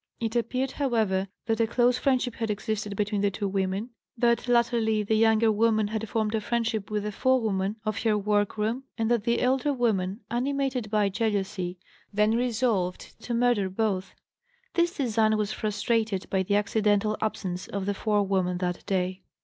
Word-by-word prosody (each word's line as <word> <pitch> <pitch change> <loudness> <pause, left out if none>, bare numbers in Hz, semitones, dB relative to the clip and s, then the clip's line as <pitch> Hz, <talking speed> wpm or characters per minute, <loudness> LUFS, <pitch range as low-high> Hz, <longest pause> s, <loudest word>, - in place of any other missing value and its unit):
It 225 0 -2
appeared, 255 +3 0
however, 220 -9 0 0.2
that 225 0 0
a 230 - +3
close 245 +2 +2
friendship 255 -3 +1
had 225 -2 -3
existed 210 -1 -2
between 205 0 0
the 205 - +3
two 200 +1 -3
women, 195 +4 -2 0.3
that 235 +1 +2
latterly 235 -3 +2
the 210 - 0
younger 220 0 +4
woman 215 -1 +2
had 220 0 -3
formed 215 -1 0
a 220 - 0
friendship 225 -2 -1
with 210 -1 -1
the 210 - -3
forewoman 210 -5 +1
of 215 0 -1
her 220 -2 +2
work 205 0 0
room, 225 +5 -1
and 225 0 0
that 235 -3 +1
the 235 -1 +2
elder 265 +3 +2
woman, 215 -6 0
animated 260 -2 -1
by 210 -1 +2
jealousy, 195 -3 -2 0.3
then 210 +1 +2
resolved 230 -6 0
to 240 - -2
murder 235 -5 +2
both; 190 -1 -2 0.6
this 345 0 +1
design 220 -4 +2
was 210 -1 -1
frustrated 215 -1 -1
by 190 - +2
the 200 +2 0
accidental 210 0 +2
absence 185 -4 -3
of 200 -1 -4
the 205 - 0
forewoman 195 -4 +1
that 180 -1 -3
day. 185 0 -1
215 Hz, 170 wpm, -27 LUFS, 200-235 Hz, 0.6 s, younger